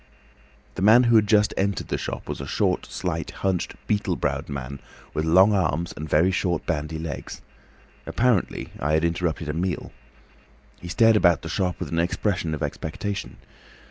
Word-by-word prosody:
"The - - -6
man 110 +5 +7
who 120 -1 +4
had 105 -2 +5
just 105 0 +4
entered 100 +1 -1
the - - 0
shop - - -5
was - - -4
a - - -6
short, - - 0
slight, - - -3 0.2
hunched, 95 -2 0
beetle 105 -1 0
browed - - -2
man, 70 0 -5 0.3
with 75 - -1
long 95 +6 +6
arms 85 -3 0
and 75 +1 -6
very 85 +5 +4
short 90 -3 -1
bandy 80 -1 -2
legs. 80 -3 -6 0.6
Apparently 120 -6 +1
I 75 +3 0
had 80 +1 +3
interrupted 85 -1 -1
a 75 - -2
meal. 90 +3 -2 0.9
He 90 - -9
stared 115 +5 +4
about 85 -5 +4
the - - -5
shop 90 -3 -1
with - - -4
an 85 - 0
expression 85 -1 0
of 75 - -5
expectation. 100 +6 -4
90 Hz, 175 wpm, -24 LUFS, 80-100 Hz, 0.9 s, man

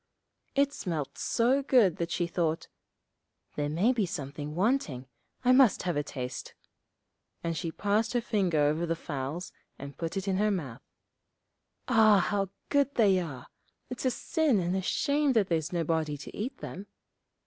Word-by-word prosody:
It 280 0 +3
smelt 160 - -4
so 250 +4 +2
good 240 - +4
that 170 0 -2
she 175 - 0
thought, 170 -2 -1 0.9
'There 145 0 -1
may 185 +12 +2
be 215 -6 0
something 150 -3 -5
wanting, 180 - 0 0.4
I 250 - +6
must 255 -4 +5
have 175 -2 -1
a 145 - +1
taste.' 125 -4 -6 0.9
And 165 0 -1
she 165 0 -3
passed 210 +5 0
her 245 - +3
finger 195 -8 0
over 155 +4 +1
the 165 - 0
fowls 150 +2 -5 0.3
and 140 0 -8
put 165 +5 -4
it 195 +1 -3
in 190 -1 +1
her 210 +2 +2
mouth. 145 - -3 1.1
'Ah, 220 -4 +6
how 195 0 0 0.2
good 280 -1 +2
they 200 -5 +4
are; 140 -8 -6 0.5
it's 250 - -5
a - - +5
sin 290 0 +1
and 180 +1 -1
a 190 - 0
shame 285 +7 +1
that 215 -5 +2
there's 160 -2 0
nobody 160 -3 -1
to 140 - -10
eat 230 +6 -4
them.' 195 +3 -8
180 Hz, 165 wpm, -29 LUFS, 155-225 Hz, 1.1 s, I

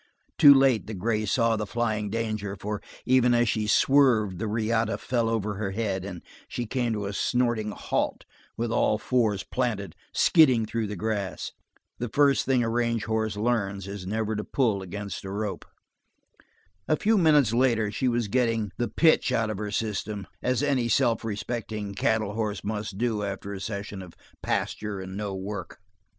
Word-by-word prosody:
Too 140 -1 +10
late 135 -6 +3
the 110 - -5
gray 110 +3 0
saw 115 +2 +2
the 105 -1 -3
flying 110 -3 -1
danger, 110 -2 -3
for 105 +1 -4 0.2
even 125 -1 +4
as 120 0 +3
she 110 -1 0
swerved 110 -7 +4
the 110 - -2
riata 110 +1 0
fell 120 -2 0
over 105 -3 -1
her 100 -2 -3
head, 100 -4 -2
and 90 -3 -7 0.2
she 120 - -4
came 120 0 -1
to 105 -2 -3
a 100 - -4
snorting 120 -1 0
halt 105 - -2 0.3
with 115 0 -1
all 110 - +2
fours 105 -4 +1
planted, 105 -9 -2 0.2
skidding 130 -9 +5
through 110 0 -2
the 105 - -5
grass. 100 0 -3 0.5
The 120 - -3
first 140 +1 +3
thing 130 -2 +3
a - - 0
range 115 -1 0
horse 110 -1 -1
learns 100 -4 -1
is 100 -2 -6
never 110 +1 -1
to 105 - -3
pull 110 -7 0
against 100 +1 -6
a 95 - -6
rope. 105 +1 -4 1.2
A 155 - +3
few 220 +2 +2
minutes 150 - +4
later 115 -4 +2
she 130 +5 -1
was 120 -2 +1
getting 115 -2 0
the 120 - 0
"pitch" 160 -1 +3
out 110 -2 +1
of 105 - -5
her 105 -1 -3
system, 105 -1 -3 0.2
as 130 +2 0
any 130 -5 +1
self 115 -1 +2
respecting 110 -1 -4
cattle 110 0 0
horse 105 -2 -2
must 105 -2 -4
do 115 -2 0
after 100 0 -4
a 95 - -6
session 100 -1 -5
of 90 -3 -12 0.3
pasture 105 -2 -2
and 95 0 -7
no 100 -1 -3
work. 100 +2 -6
110 Hz, 175 wpm, -26 LUFS, 100-120 Hz, 1.2 s, Too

